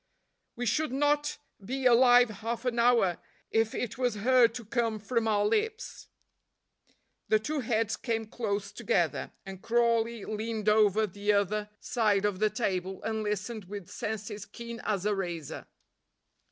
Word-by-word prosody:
We 245 - -3
should 300 +5 +1
not 295 +2 +1 0.3
be 260 +6 -4
alive 245 -1 +6
half 230 +2 -3
an 240 -1 0
hour 235 -7 +3 0.3
if 225 0 +1
it 245 0 -4
was 245 -3 +1
heard 235 +1 +4
to 240 -3 -6
come 230 0 0
from 225 +2 -1
our 205 -1 +2
lips." 440 - -2 1.2
The 215 - +4
two 295 +8 -3
heads 220 -3 0
came 225 -2 -2
close 210 -2 -3
together, - - 0
and 195 -1 -8
Crawley 230 -1 +1
leaned 215 0 -4
over 215 0 +4
the 205 +1 -1
other 205 +1 0
side 210 -4 +1
of 200 -3 -1
the 215 0 +3
table 190 -4 -2
and 220 -1 -2
listened 210 +1 -3
with 200 -1 -8
senses 210 -1 -5
keen 235 +2 -8
as 200 -2 -1
a 210 - +2
razor. 175 -6 -5
220 Hz, 150 wpm, -29 LUFS, 205-240 Hz, 1.2 s, alive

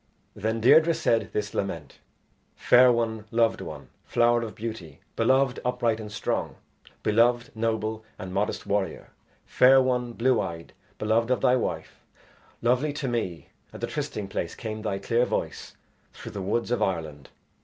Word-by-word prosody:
Then 110 +2 -2
Deirdre 160 +7 +6
said 115 - +1
this 105 0 -3
lament: 80 -7 -4 0.6
"Fair 125 0 +6
one, 110 -2 -1
loved 115 0 +2
one, - - -8
flower 120 0 +2
of 115 -2 -6
beauty; 100 -9 -7 0.2
beloved, 130 +2 +2
upright, 120 -3 0
and 105 -1 -7
strong; 110 - -2 0.5
beloved, 120 +2 +2
noble, 110 -1 -2
and 95 -1 -7
modest 100 +2 -1
warrior. 100 -4 -2 0.3
Fair 135 +1 +6
one, 125 -2 0
blue 125 0 +2
eyed, 85 -3 -6 0.2
beloved 110 +2 +1
of 125 - +1
thy 125 - +4
wife; 125 - -3 0.6
lovely 130 +5 +2
to 145 -2 -3
me 110 -9 -3 0.2
at - - -10
the - - -1
trysting 105 -2 -4
place 85 -3 -4
came 110 -1 -5
thy 105 -3 -2
clear 115 +5 +1
voice - - -4 0.4
through - - -9
the 100 - -5
woods 110 +5 -1
of 120 - 0
Ireland. 80 -6 -3
115 Hz, 155 wpm, -26 LUFS, 105-120 Hz, 0.6 s, Deirdre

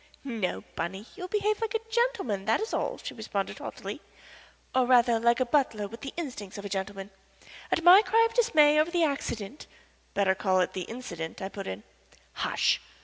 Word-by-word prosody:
"No, 215 - -3
Bunny 190 +4 -4
you 390 - -10
will 365 - -4
behave 420 +2 0
like 450 0 -2
a 450 0 -3
gentleman, 430 - 0
that 220 - +2
is 440 - -4
all," - - -1
she - - -7
responded, 205 -3 -4
haughtily; - - -7 0.7
"or 255 -1 +3
rather 240 -2 +5
like 235 +1 +3
a 255 - +2
butler 240 -6 +1
with 230 +3 -11
the 275 - -5
instincts 245 - -6
of 200 - -7
a - - -4
gentleman. 195 0 -4 0.6
At 330 - +1
my 360 +4 +9
cry 450 +1 +4
of 455 - -13
dismay 305 -11 +5
over 310 +2 +3
the 345 -1 +1
accident 275 -4 -3 0.2
" - - -35
"Better 195 -2 +3
call 190 -1 +1
it 180 - -1
the 185 -2 -4
incident," 170 -10 -6
I 190 - -4
put 195 -1 -7
in. 95 - -5 0.5
"Hush! - - +1
240 Hz, 200 wpm, -28 LUFS, -, 0.7 s, my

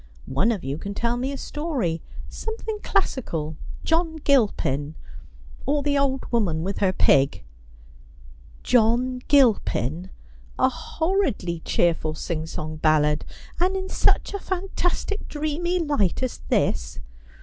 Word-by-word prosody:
One 140 - +2
of 210 -6 -3
you 140 +3 -3
can 200 0 -5
tell 235 +2 0
me 255 +3 -2
a 280 - -4
story 270 - -2 0.2
— - - -6
something 445 -1 -5
classical 160 - -1
— - - -11
John 325 0 +1
Gilpin, 200 - +1 0.7
or 285 +1 +1
the 285 0 +1
Old 270 -1 +1
Woman 180 -9 +1
with 195 +2 -3
her 195 -2 +3
Pig.' 140 - +3 0.6
' - - -22
John 250 +2 +3
Gilpin! 190 - +3 0.5
a 260 - +4
horridly 280 - -1
cheerful 160 -2 +1
singsong 155 -1 -4
ballad 150 -1 +3 0.2
— - - -18
and 370 +2 +2
in 380 0 -4
such - - +2
a 400 - -2
fantastic 380 +2 -2
dreamy 310 +4 -1
light 285 - +1
as 255 - -2
this - - 0
235 Hz, 135 wpm, -24 LUFS, -, 0.7 s, a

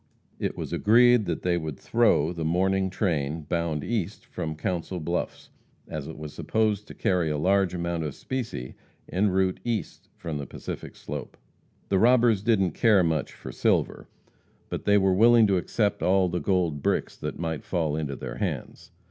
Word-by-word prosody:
It - - -2
was - - -5
agreed 120 +1 +5
that 85 - -3
they 90 -1 +2
would 80 -4 -5
"throw" 100 -9 +2
the 85 -2 -4
morning 95 +4 +1
train 80 -5 -1
bound 80 -1 -2
east 110 -8 -3
from 80 -1 -5
Council 90 +2 -3
Bluffs, 85 +2 -4 0.4
as 75 -3 -5
it 80 - -8
was 75 -1 -7
supposed 105 -2 0
to - - -10
carry 90 -4 +1
a 75 - -1
large 95 +3 +2
amount 85 -1 -2
of 75 - -5
specie 115 - -5 0.4
en 100 +3 +2
route 95 0 +1
east 115 -3 -4
from 80 -3 -5
the 70 - -6
Pacific - - -7
slope. - - -7 0.5
The 95 - +3
robbers 120 -2 +4
didn't 100 -5 +2
care 105 0 +4
much 80 -2 -1
for - - -9
silver, - - 0 0.6
but - - -5
they 100 0 +5
were 95 -1 +3
willing 115 +3 +6
to 100 -2 +2
accept 105 +3 0
all 95 0 +3
the 90 +1 -1
gold 85 -7 0
bricks - - 0
that - - -5
might 80 -2 -3
fall 80 -5 -1
into 75 -3 -3
their 65 -1 -6
hands. - - -4
90 Hz, 175 wpm, -26 LUFS, 80-100 Hz, 0.6 s, willing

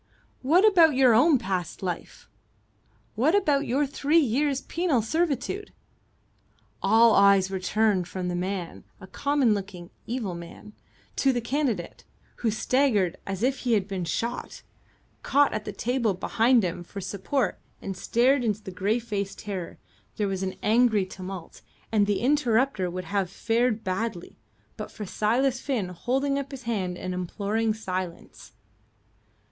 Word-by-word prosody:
"What 335 +10 +4
about 335 -8 +6
your 255 -3 +5
own 275 +6 +5
past 185 -5 -4
life? 180 -2 -5 0.9
What 280 - +2
about 295 -8 +2
your 275 +4 +1
three 285 +3 +1
years' 280 0 +2
penal 325 -9 0
servitude?" 325 - -1 1.1
All 225 0 +5
eyes 200 -1 +5
were 190 - -2
turned 200 -1 +1
from 180 -1 -4
the 180 - -2
man 180 -1 -4 0.2
a - - -10
common 275 +3 +1
looking, 190 -3 -6 0.2
evil 225 -6 -3
man 170 +5 -10 0.4
to 270 - +3
the 245 - -1
candidate, 235 - -2 0.3
who 230 - 0
staggered 220 -4 +1
as 195 +2 -3
if 265 +1 +1
he 245 -2 0
had 200 -3 +1
been 190 -3 -3
shot, 235 +9 -4 0.6
caught 285 0 +3
at 215 0 -3
the 210 - -4
table 230 -1 0
behind 230 +5 +3
him 175 -1 -3
for 200 +3 -8
support 200 +8 -2 0.2
and 195 - -5
stared 250 +7 +2
in 220 -3 +2
greyfaced 205 +1 -3
terror. 190 -5 -6 0.4
There 210 - 0
was 190 -1 -3
an 190 -1 -3
angry 220 -2 +3
tumult, 185 -2 -9 0.3
and 210 -2 +3
the 205 -1 0
interrupter 250 -6 +2
would 185 +1 -5
have 195 +1 -1
fared 225 +2 0
badly, 185 -1 -3 0.4
but - - -6
for 210 - -7
Silas 240 +7 +1
Finn 235 -10 -2
holding 270 +10 -1
up 280 0 -5
his 270 -2 -9
hand 190 -7 -2
and 185 0 -4
imploring 205 +5 -1
silence. 185 -5 -6
220 Hz, 145 wpm, -26 LUFS, 190-260 Hz, 1.1 s, about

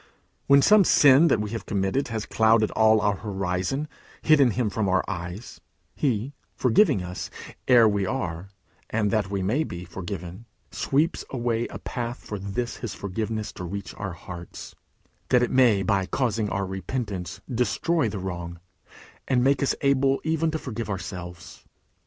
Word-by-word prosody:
When 140 0 +6
some 210 -1 +7
sin 145 -1 +6
that 115 - +3
we 105 -1 -3
have 115 - -5
committed 100 +6 0
has 110 -3 -4
clouded 110 -1 +3
all 110 -1 +4
our 100 -1 +1
horizon, 95 +5 -2
and 150 - -6 0.4
hidden 145 -5 +6
him 115 -1 -1
from 100 -1 -1
our 95 0 +2
eyes, 90 +6 -6 0.3
he, 130 -1 -1 0.2
forgiving 130 - +3
us, 90 0 -6 0.4
ere 120 -3 +7
we 100 -2 0
are, 95 -8 -3 0.4
and 105 -2 0
that 105 -2 0
we 100 -1 -2
may 125 +12 +1
be, 90 - -7
forgiven, 90 +3 -7 0.2
sweeps 150 +5 0
away 120 -2 -1
a - - -8
path 120 0 -4
for 105 - -7
this 100 +5 -4
his 120 - -6
forgiveness 110 +2 -4
to - - -7
reach 100 +2 -6
our 100 -3 -5
hearts, 85 0 -9 0.6
that 125 -1 +4
it 125 - -1
may 120 -7 +4
by 95 -1 +1
causing 110 -4 0
our 100 0 -1
repentance 95 -2 -4
destroy 125 - 0
the 105 - -5
wrong, 85 -2 -5 0.7
and 125 -1 +2
make 140 +1 +3
us 140 - +1
able 135 -1 +2
even 160 0 +1
to 160 - -2
forgive 115 -7 -5
ourselves. 90 -2 -7
110 Hz, 165 wpm, -25 LUFS, 95-130 Hz, 0.7 s, some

